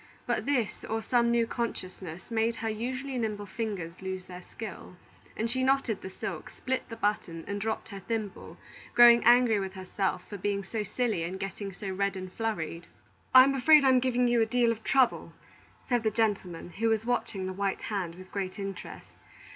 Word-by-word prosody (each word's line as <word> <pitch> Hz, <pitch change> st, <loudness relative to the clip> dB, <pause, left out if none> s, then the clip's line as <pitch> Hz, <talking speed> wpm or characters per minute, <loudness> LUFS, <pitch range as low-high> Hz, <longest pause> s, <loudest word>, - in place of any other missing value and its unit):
But -, -, -1 dB
this, 250 Hz, -7 st, 0 dB
or 225 Hz, 0 st, -2 dB
some 235 Hz, 0 st, +3 dB
new 235 Hz, -1 st, +3 dB
consciousness, 185 Hz, -6 st, -5 dB
made 225 Hz, +1 st, +1 dB
her 225 Hz, -, -4 dB
usually 255 Hz, +4 st, -3 dB
nimble 210 Hz, -3 st, -2 dB
fingers 195 Hz, -6 st, -5 dB
lose 190 Hz, -1 st, -4 dB
their 180 Hz, -1 st, -9 dB
skill, 190 Hz, -1 st, -9 dB, 0.4 s
and 225 Hz, -, 0 dB
she 260 Hz, +3 st, 0 dB
knotted 260 Hz, -5 st, +1 dB
the 190 Hz, -, -6 dB
silk, 190 Hz, -, -6 dB
split 260 Hz, 0 st, -3 dB
the 230 Hz, -, -6 dB
button, 205 Hz, -6 st, -2 dB
and 200 Hz, 0 st, -3 dB
dropped 220 Hz, +1 st, -2 dB
her 200 Hz, -2 st, -7 dB
thimble, 215 Hz, 0 st, -5 dB, 0.4 s
growing 240 Hz, 0 st, +8 dB
angry 240 Hz, -2 st, +6 dB
with 190 Hz, -1 st, -4 dB
herself 190 Hz, +1 st, -2 dB
for 205 Hz, -, -7 dB
being 200 Hz, +1 st, -1 dB
so 215 Hz, +3 st, -3 dB
silly 220 Hz, -2 st, -1 dB
and 180 Hz, +3 st, -4 dB
getting 195 Hz, +1 st, -5 dB
so 195 Hz, +1 st, -6 dB
red 200 Hz, +1 st, -1 dB
and 185 Hz, 0 st, -7 dB
flurried. 170 Hz, -7 st, -3 dB, 0.5 s
"I'm 260 Hz, +2 st, +9 dB
afraid 280 Hz, +2 st, +6 dB
I'm 260 Hz, -1 st, +6 dB
giving 250 Hz, -1 st, +2 dB
you 240 Hz, -1 st, +3 dB
a -, -, +4 dB
deal 240 Hz, 0 st, +3 dB
of 225 Hz, -1 st, -5 dB
trouble," 265 Hz, -2 st, +2 dB, 0.5 s
said 245 Hz, -2 st, +2 dB
the 220 Hz, -, +2 dB
gentleman, 195 Hz, -6 st, -1 dB
who 225 Hz, +5 st, 0 dB
was 220 Hz, 0 st, +1 dB
watching 215 Hz, -5 st, -1 dB
the 185 Hz, -, -3 dB
white 195 Hz, 0 st, -2 dB
hand 185 Hz, -6 st, -3 dB
with 185 Hz, +1 st, -13 dB
great 190 Hz, -1 st, -3 dB
interest. 195 Hz, -1 st, -7 dB
215 Hz, 185 wpm, -29 LUFS, 190-235 Hz, 0.5 s, I'm